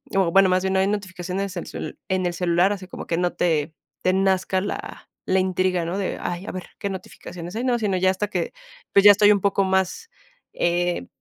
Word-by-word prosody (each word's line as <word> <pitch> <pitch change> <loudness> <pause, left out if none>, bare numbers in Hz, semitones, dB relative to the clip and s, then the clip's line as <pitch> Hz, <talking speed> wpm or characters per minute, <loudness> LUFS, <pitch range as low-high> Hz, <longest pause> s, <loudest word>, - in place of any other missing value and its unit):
O 185 -3 +3
bueno, 195 +1 +6
más 185 +1 +2
bien 190 0 0
no 190 - +2
hay 190 - +3
notificaciones 190 -1 -3
en - - -4
cel - - -7
en 185 -1 0
el 175 - 0
celular, 175 +2 +2
así 190 -3 -5
como - - -8
que 165 - -1
no 180 0 0
te 155 -2 0 0.3
te 185 - +2
nazca 190 -1 +1
la 205 - -6 0.2
la 190 0 +2
intriga, 185 -1 +1
¿no? 175 +4 -3
De: 195 - -2
"Ay, 175 +2 -4
a - - -5
ver 185 - -6
qué 200 - -2
notificaciones 180 -1 -8
hay", 245 - -2
¿no? 245 -2 +2
Sino 200 -4 0
ya 185 +1 +3
hasta 205 +2 -3
que, 475 - -2 0.4
pues, 200 - +6
ya 205 - +12
estoy 205 +1 +5
un 200 - -1
poco 200 0 +2
más, 190 - 0 0.4
eh, 175 - 0
185 Hz, 225 wpm, -23 LUFS, 180-195 Hz, 0.4 s, ya